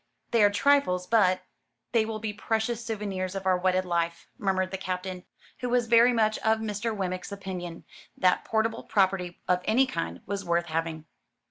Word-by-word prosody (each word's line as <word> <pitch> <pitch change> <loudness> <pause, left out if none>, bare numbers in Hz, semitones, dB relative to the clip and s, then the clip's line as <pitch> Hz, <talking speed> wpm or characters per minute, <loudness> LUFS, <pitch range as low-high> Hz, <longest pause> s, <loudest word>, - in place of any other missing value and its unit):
They 230 -3 +4
are 205 - +7
trifles, 205 -6 +2
but 185 -3 +3 0.2
" - - -53
"They 220 -2 +3
will 220 -1 -3
be 215 -1 -4
precious 225 +2 -1
souvenirs 200 -4 -3
of 195 -1 -4
our 185 -1 +4
wedded 185 +1 +1
life," 170 -1 -1
murmured 190 -2 0
the 190 - -3
Captain, 185 0 -4 0.3
who 250 - -2
was 245 -1 +2
very 235 +2 +6
much 215 -2 +2
of 220 0 +2
Mr. 220 +1 -2
Wemmick's 185 0 -3
opinion, 185 -4 -6 0.3
that 180 -1 +3
portable 225 0 0
property 190 -3 0
of 180 0 +2
any 245 +5 +4
kind 85 - -4
was 200 0 -3
worth 170 -1 +1
having. 160 -1 -3
195 Hz, 175 wpm, -27 LUFS, 180-220 Hz, 0.3 s, are